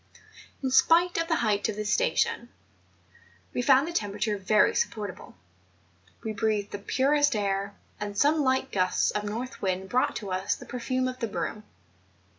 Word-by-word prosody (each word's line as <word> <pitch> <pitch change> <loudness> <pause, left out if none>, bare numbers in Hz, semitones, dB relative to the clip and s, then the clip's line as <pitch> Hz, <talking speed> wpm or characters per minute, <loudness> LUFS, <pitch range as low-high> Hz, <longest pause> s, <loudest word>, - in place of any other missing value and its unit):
In 260 - 0
spite 340 +6 +4
of 330 - -1
the 330 - +2
height 205 0 +1
of 215 - -3
this 210 0 -1
station, - - +1 1.0
we - - 0
found 270 +3 +4
the - - -4
temperature 210 - -1
very 210 +2 +3
supportable; 205 - -3 0.9
we 220 - -3
breathed 215 -2 -1
the 205 - -5
purest 280 +5 +2
air, 200 -1 -1 0.2
and 205 -1 -5
some 300 +5 +3
liglit 260 0 +1
gusts 185 -2 +1
of 210 - -2
north 235 +5 -5
wind 190 0 -2
brought 255 +1 +1
to 200 -3 -5
us 185 +1 0
the - - -12
perfume 255 +1 -2
of 255 0 -5
the 230 - -1
broom. 215 0 -4
215 Hz, 165 wpm, -27 LUFS, 205-260 Hz, 1.0 s, spite